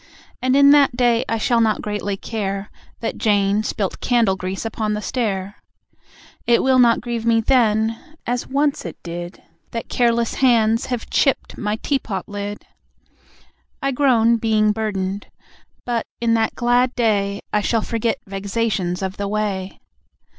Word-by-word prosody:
And, 255 +1 +2
in 280 0 +7
that 285 -4 +5
day, 240 -2 +3
I 230 - 0
shall 230 +1 +2
not 220 -1 +1
greatly 205 -1 -3
care 200 -2 -4 0.3
That 230 - -3
Jane 205 -1 +2
spilt 205 -3 -3
candle 235 -6 +2
grease 190 +2 -5
upon 215 -1 -2
the - - -2
stair. 200 -5 -2 0.9
It 235 -1 +4
will 260 -1 +4
not 235 -2 +5
grieve 235 -2 -3
me 230 0 +3
then, 225 -2 +2 0.3
as 245 0 -2
once 285 +1 0
it - - -7
did, 175 +1 -7 0.3
That 230 - -6
careless 235 -1 +1
hands 230 -2 +3
have 245 -3 -4
chipped 275 -3 +1
my 210 -1 -2
teapot 220 -6 -3
lid. 205 0 -6 1.1
I 275 - -1
groan, 240 -4 +3
being 215 -1 +2
burdened. 205 -2 -3 0.6
But, 235 -2 -2
in 235 -1 +1
that 225 -1 +1
glad 245 +1 +2
day, 200 -4 0
I 210 - +2
shall 225 +1 0
forget 230 0 -1
vexations 195 -2 -2
of 190 0 -4
the 200 - -2
way. 200 -2 -3
225 Hz, 150 wpm, -21 LUFS, 205-240 Hz, 1.1 s, in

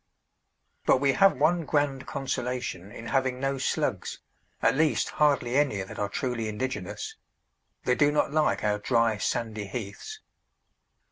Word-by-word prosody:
But - - +6
we 135 +1 +3
have 195 -5 +5
one 165 +4 +3
grand 145 -3 0
consolation 125 - -3
in 115 0 -9
having 130 0 0
no 135 0 -1
slugs, - - -1 0.4
at - - +3
least 155 +1 +2
hardly 140 -5 +2
any 135 -9 +2
that 95 - -9
are 100 - -1
truly 120 0 -2
indigenous; 110 -3 -4 0.7
they 125 - +2
do 145 +3 +4
not 150 -1 +1
like 155 0 +1
our 105 -1 +1
dry, 115 0 +2
sandy 110 -2 -2
heaths. 120 - -6
130 Hz, 140 wpm, -27 LUFS, 110-145 Hz, 0.7 s, But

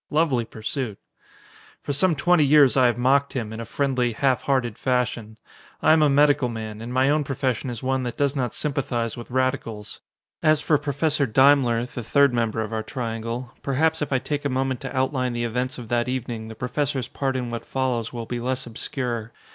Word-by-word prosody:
Lovely 145 -7 +1
pursuit! 110 0 -4 0.9
For 145 - -2
some 170 +4 +3
twenty 175 +1 +3
years 145 -2 +5
I 130 -2 +5
have 120 -1 0
mocked 135 +3 +2
him, 110 -4 -3
in 110 - -6
a 115 - -5
friendly, 125 -1 0
half 130 +1 +1
hearted 130 -5 0
fashion. 125 -4 -1 0.4
I - - +5
am 160 - +4
a 150 - +5
medical 145 -2 +4
man, 110 -2 -6
and 115 +2 -6
my 130 +1 +3
own 150 0 +2
profession 130 -2 -2
is 120 -1 -6
one 130 0 0
that 120 -2 -4
does 140 0 +1
not 125 -4 -1
sympathize 130 -6 -2
with 120 - -9
radicals. 130 -5 -2 0.4
As 155 -1 +4
for 150 -1 +2
Professor 145 0 0
Daimler, 125 -1 +4
the 125 0 -7
third 140 +3 +3
member 115 -2 0
of 110 +1 -6
our 110 - -1
triangle 115 +1 -4
perhaps, 160 +4 +1
if 150 - -2
I 135 - +3
take 145 +3 -3
a 145 - 0
moment 130 -1 -1
to 135 0 -5
outline 130 -1 0
the 120 0 -2
events 125 +3 -2
of 120 -3 -8
that 120 0 +1
evening, 120 -3 -4
the 110 - -8
Professor's 130 +1 -2
part 135 0 -2
in 125 -2 -3
what 115 - -4
follows 125 -4 -2
will 120 -2 -5
be 120 +1 -4
less 130 +2 -2
obscure. 120 -1 -4
130 Hz, 205 wpm, -24 LUFS, 120-140 Hz, 0.9 s, years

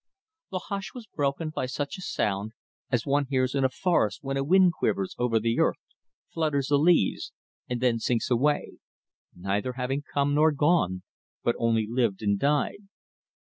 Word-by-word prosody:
The 190 - -3
hush 200 +2 -4
was 245 -3 -8
broken 150 -3 -2
by 130 - -3
such 145 +8 -4
a - - -8
sound 105 - -2 0.4
as 120 -3 0
one 140 0 +1
hears 130 -2 +1
in 135 -1 +1
a 130 - +3
forest 150 - 0
when 135 0 -2
a 135 - 0
wind 180 +3 +5
quivers 100 - -1
over 120 -2 +2
the 115 +1 0
earth, - - +2 0.6
flutters 150 -4 0
the 145 - +4
leaves, 165 - +2 0.4
and 125 -1 -2
then 120 -2 +2
sinks 120 +2 -1
away 145 +5 +1 0.6
neither 100 +7 -2
having 130 +2 -2
come 145 0 -1
nor 155 +2 +4
gone, 140 - +1 0.4
but 120 - +2
only 115 -1 +2
lived 115 -4 0
and 100 -1 +1
died. 150 +8 0
135 Hz, 170 wpm, -27 LUFS, 115-150 Hz, 0.6 s, wind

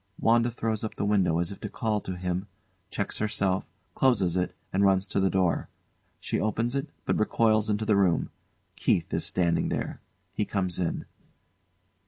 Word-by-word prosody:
WANDA 115 +1 +4
throws 110 -2 -2
up 110 - -4
the - - -1
window 95 -5 +3
as 85 +1 0
if 100 - -8
to 105 - -5
call 105 -1 -1
to 95 - -5
him, 90 +2 -2 0.4
checks - - -2
herself, 100 -3 0 0.3
closes 100 -10 +2
it 90 0 -1 0.2
and 100 - +3
runs 95 -1 +4
to 100 - -1
the 95 0 +3
door. 90 -1 +1 0.5
She - - -2
opens 115 +3 0
it, 140 0 -2 0.2
but - - +1
recoils 110 0 +3
into 105 +1 0
the 105 - +3
room. 95 -4 +2 0.4
KEITH - - +1
is - - 0
standing 85 -2 +1
there. - - -3 0.3
He - - 0
comes 95 -4 -2
in. 90 - -1
100 Hz, 175 wpm, -28 LUFS, 95-110 Hz, 0.5 s, WANDA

